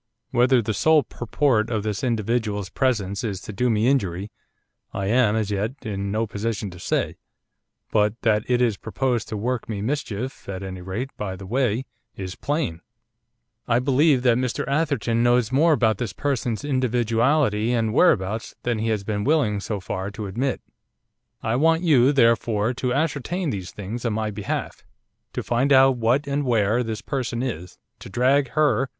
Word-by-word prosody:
Whether 125 Hz, 0 st, +4 dB
the 110 Hz, -, -1 dB
sole 155 Hz, +8 st, +4 dB
purport 120 Hz, -1 st, 0 dB
of 110 Hz, -3 st, -1 dB
this 105 Hz, +4 st, -3 dB
individual's 110 Hz, -4 st, -1 dB
presence 105 Hz, -7 st, 0 dB
is 100 Hz, -5 st, -3 dB
to 105 Hz, -, -8 dB
do 125 Hz, +5 st, +1 dB
me 110 Hz, +1 st, +2 dB
injury, 100 Hz, -7 st, 0 dB, 0.6 s
I 100 Hz, -, -2 dB
am, 110 Hz, 0 st, +3 dB
as 110 Hz, -2 st, -1 dB
yet, 105 Hz, +5 st, -1 dB
in 100 Hz, -2 st, -3 dB
no 110 Hz, +2 st, 0 dB
position 105 Hz, -1 st, -3 dB
to 85 Hz, -, -11 dB
say, -, -, -1 dB, 0.7 s
but 105 Hz, +1 st, +2 dB
that 110 Hz, -2 st, +3 dB
it 125 Hz, 0 st, +3 dB
is 115 Hz, -5 st, +1 dB
proposed 120 Hz, 0 st, -1 dB
to 110 Hz, -, -3 dB
work 120 Hz, +3 st, -2 dB
me 105 Hz, -3 st, -3 dB
mischief, 130 Hz, -3 st, -4 dB
at 95 Hz, 0 st, -5 dB
any 95 Hz, -1 st, -6 dB
rate, 105 Hz, +9 st, -4 dB
by 95 Hz, -3 st, -4 dB
the 95 Hz, +1 st, -10 dB
way, 125 Hz, +2 st, 0 dB, 0.3 s
is 95 Hz, -1 st, -5 dB
plain. 140 Hz, -, -2 dB, 0.9 s
I 115 Hz, -, +3 dB
believe 135 Hz, +1 st, +3 dB
that 120 Hz, -1 st, +4 dB
Mr 125 Hz, -1 st, -2 dB
Atherton 135 Hz, -6 st, 0 dB
knows 120 Hz, -1 st, +3 dB
more 155 Hz, +5 st, +4 dB
about 110 Hz, -6 st, +2 dB
this 115 Hz, -6 st, -3 dB
person's 125 Hz, -4 st, -2 dB
individuality 120 Hz, -2 st, +1 dB
and 115 Hz, -3 st, 0 dB
whereabouts 110 Hz, -, +2 dB
than 120 Hz, -2 st, 0 dB
he 110 Hz, -, -1 dB
has 105 Hz, -3 st, 0 dB
been 105 Hz, 0 st, -2 dB
willing, 130 Hz, -8 st, +2 dB
so 105 Hz, +1 st, -3 dB
far, 95 Hz, +1 st, -4 dB
to 105 Hz, +1 st, -6 dB
admit. 120 Hz, +7 st, -2 dB, 0.8 s
I 110 Hz, +1 st, 0 dB
want 165 Hz, +4 st, +3 dB
you, 140 Hz, -6 st, +5 dB
therefore, 115 Hz, -3 st, +2 dB
to 125 Hz, 0 st, -2 dB
ascertain 160 Hz, +4 st, -1 dB
these 95 Hz, -3 st, -5 dB
things 105 Hz, +5 st, -6 dB
on 115 Hz, -3 st, 0 dB
my 110 Hz, 0 st, -1 dB
behalf; 100 Hz, -, -4 dB, 0.5 s
to -, -, -3 dB
find 125 Hz, +4 st, +1 dB
out 135 Hz, -1 st, +6 dB
what, 120 Hz, +5 st, +2 dB
and 140 Hz, +1 st, -1 dB
where, 115 Hz, -2 st, +2 dB
this 110 Hz, -3 st, -4 dB
person 125 Hz, -3 st, -2 dB
is, 90 Hz, -9 st, -5 dB, 0.2 s
to -, -, -10 dB
drag 130 Hz, +7 st, +2 dB
her! 140 Hz, -3 st, +2 dB
115 Hz, 175 wpm, -23 LUFS, 105-130 Hz, 0.9 s, out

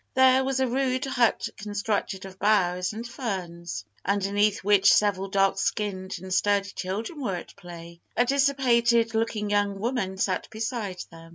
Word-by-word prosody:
There 260 Hz, 0 st, +5 dB
was 265 Hz, 0 st, -1 dB
a 265 Hz, -, +3 dB
rude 260 Hz, +1 st, 0 dB
hut 245 Hz, -4 st, +1 dB
constructed 205 Hz, -2 st, -3 dB
of 190 Hz, 0 st, -11 dB
boughs 180 Hz, -4 st, +2 dB
and 225 Hz, +2 st, -6 dB
ferns, 175 Hz, -, -5 dB, 0.2 s
underneath 200 Hz, +1 st, +1 dB
which 200 Hz, 0 st, +5 dB
several 200 Hz, -2 st, +2 dB
dark 195 Hz, 0 st, +2 dB
skinned 195 Hz, -2 st, -2 dB
and 185 Hz, +1 st, -5 dB
sturdy 200 Hz, +1 st, +1 dB
children 215 Hz, -, -5 dB
were 200 Hz, -8 st, -1 dB
at 175 Hz, -, -9 dB
play. 170 Hz, -2 st, -11 dB, 0.2 s
A 245 Hz, -, +4 dB
dissipated 240 Hz, -4 st, +2 dB
looking 220 Hz, -2 st, -1 dB
young 205 Hz, -1 st, +1 dB
woman 205 Hz, -3 st, -2 dB
sat 190 Hz, -1 st, -1 dB
beside 220 Hz, -4 st, -4 dB
them. 165 Hz, 0 st, -13 dB
205 Hz, 155 wpm, -26 LUFS, 190-235 Hz, 0.2 s, There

